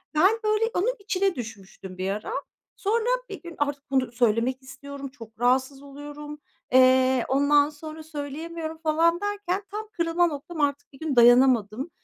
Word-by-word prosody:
ben, 385 +9 +4
böyle, 430 +1 +2
onun 455 +8 +1
içine 390 -2 0
düşmüştüm 195 -5 -9
bir 185 +1 -2
ara. 215 - -4 0.4
Sonra 450 +3 0 0.2
bir 395 - -7
gün 345 -1 -9
artık 285 -1 -3
bunu 260 -3 +1
söylemek 240 +2 +1
istiyorum, 275 +2 -8
çok 230 -5 -13
rahatsız 260 +3 +1
oluyorum, 290 +1 -9 0.3
eee, 260 -1 +5
ondan 285 +2 +4
sonra 310 +1 -9
söyleyemiyorum 315 +2 -6
falan 330 +2 +2
derken, 410 -1 -2
tam 425 +1 -5
kırılma 335 +1 +2
noktam 310 +1 -5
artık. 285 0 -1
Bir 270 - -15
gün 315 -4 -2
dayanamadım. 245 +1 +5
290 Hz, 150 wpm, -25 LUFS, 260-335 Hz, 0.4 s, eee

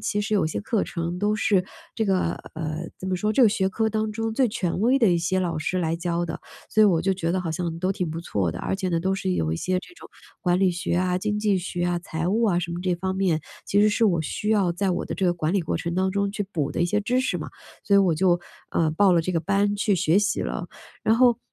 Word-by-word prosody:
其 210 0 -1
实 215 +1 -1
有 200 - +3
一 155 - 0
些 - - -3
课 220 0 0
程 170 +1 -4
都 205 +2 +1
是 200 -3 +2 0.3
这 220 - +1
个 185 -4 +1 0.2
呃， 160 +1 -4
怎 185 - -6
么 185 - 0
说， 210 +4 0
这 260 - +4
个 230 - +7
学 190 -2 +1
科 220 +3 0
当 215 0 -1
中 225 +1 -2
最 255 +2 +3
权 185 -5 -2
威 250 +6 +3
的 215 -7 +5
一 170 - +2
些 185 +3 0
老 170 -3 -1
师 185 +4 -1
来 165 -1 0
教 170 0 -1
的， 170 - -5 0.3
所 215 - +1
以 - - +8
我 175 -5 +3
就 195 +2 +2
觉 170 -2 -1
得 185 - 0
好 170 -3 -3
像 165 +1 -3
都 185 - +1
挺 180 -3 -2
不 160 +1 -4
错 95 - -1
的， - - -6
而 - - -2
且 190 -1 -2
呢， 170 -2 0
都 190 +3 0
是 95 - -1
有 80 -3 0
一 - - -1
些 185 - -2
这 355 - -14
种 - - -13 0.3
管 175 0 +2
理 190 -1 +3
学 180 +2 -3
啊、 180 0 +1
经 210 +2 -1
济 210 -2 +2
学 175 -1 -3
啊、 175 0 0
财 165 -1 -4
务 220 +5 +2
啊 185 -6 +2
什 170 -1 -3
么 175 - -4
这 180 -1 +1
方 190 +2 -3
面， 185 -5 +1 0.3
其 205 - +2
实 215 - +5
是 230 +2 +2
我 170 -5 +1
需 210 +6 -4
要 200 -5 +3
在 190 +2 0
我 175 - -1
的 - - -4
这 190 - 0
个 175 - +2
管 165 -1 -1
理 195 - +2
过 160 - -2
程 170 0 -3
当 190 +1 +1
中 200 +1 0
去 205 - -2
补 150 -4 -1
的 - - -2
一 175 - +3
些 210 +4 +1
知 250 +5 +1
识 200 - -1
嘛， 155 - -5 0.4
所 200 - +2
以 - - +7
我 185 -4 +3
就， 175 +1 +2 0.3
呃， 160 -2 +1
报 190 +4 +4
了 170 - +4
这 175 - -3
个 165 - +1
班 200 +3 +1
去 205 0 +2
学 170 0 +3
习 205 0 0
了， - - -4 0.3
然 220 - +3
后， 245 -1 +4
185 Hz, 310 characters per minute, -24 LUFS, 170-205 Hz, 0.4 s, 以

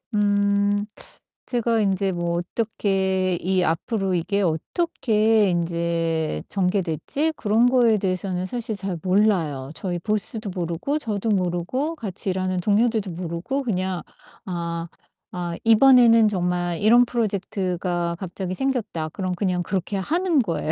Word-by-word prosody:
음 205 0 +2 0.6
제가 235 -2 +1
인제 195 -1 +1
뭐 170 0 -1
어떻게 190 -1 0
이 185 +1 +1
앞으로 190 +3 -1
이게 200 +4 0
어떻게 215 - +1
인제 165 - -1
전개될지 195 - 0
그런 225 +1 +2
거에 245 -3 +4
대해서는 185 -1 -2
사실 235 0 -3
잘 195 -2 -3
몰라요. 180 -9 +1
저희 175 -2 -3
보스도 215 +3 -1
모르고 175 - -2
저도 220 -4 -2
모르고 195 - -1
같이 195 -5 -3
일하는 185 0 -1
동료들도 215 0 +1
모르고 175 +10 -3
그냥 185 -6 -2 0.4
아, 170 -3 -4 0.4
아 175 -1 -4
'이번에는 230 -1 +6
정말 175 -3 -1
이런 235 +4 +5
프로젝트가 185 -6 -2
갑자기 185 0 -4
생겼다.' 230 -11 -2
그럼 185 +3 -3
그냥 180 -1 0
그렇게 190 +2 -2
하는 330 - +1
거예요. 170 -8 -1
190 Hz, 285 characters per minute, -23 LUFS, 175-220 Hz, 0.6 s, 이번에는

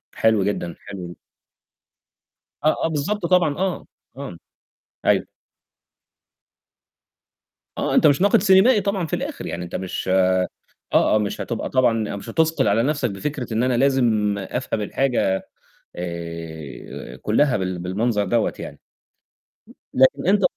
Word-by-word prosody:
حلو 110 -3 +3
جدًا، 90 -4 -2
حلو. 90 -4 -8 1.5
آه، 155 - +4
آه، - - +3
بالضبط 165 +6 -2
طبعًا، 175 -5 +3
آه، 185 0 -2 0.3
آه، 135 -11 -7 0.7
أيوه. - - +3 2.5
آه، - - 0
أنت - - +6
مش 145 +2 +3
ناقد 200 -1 +4
سينيمائي 205 +4 +5
طبعًا 195 -2 -1
في - - -1
الآخر - - -5
يعني، 90 - -4
أنت 85 - -7
مش 95 0 -4
آه، 95 -1 +3 0.5
آه، - - +4
مش 105 -1 -3
هتبقى 115 -2 -3
طبعًا 115 -5 +1
مش 100 - -8
هتُثقل 160 -6 +2
على 105 +3 +3
نفسك 145 -2 0
بفكرة 125 +3 -4
إن 115 +2 +1
أنا 125 -1 +1
لازم 120 -6 +2
أفهم 110 +3 -3
الحاجة 105 -4 0 0.6
آآ 85 -7 -7
كلّها 125 - +2
بال 95 -2 -3
بالمنظر 105 +5 0
دوّة 110 +4 +1
يعني. - - -8 1.1
لكن 135 +4 +3
أنت 200 +1 +3
115 Hz, 130 wpm, -22 LUFS, 95-150 Hz, 2.5 s, أنت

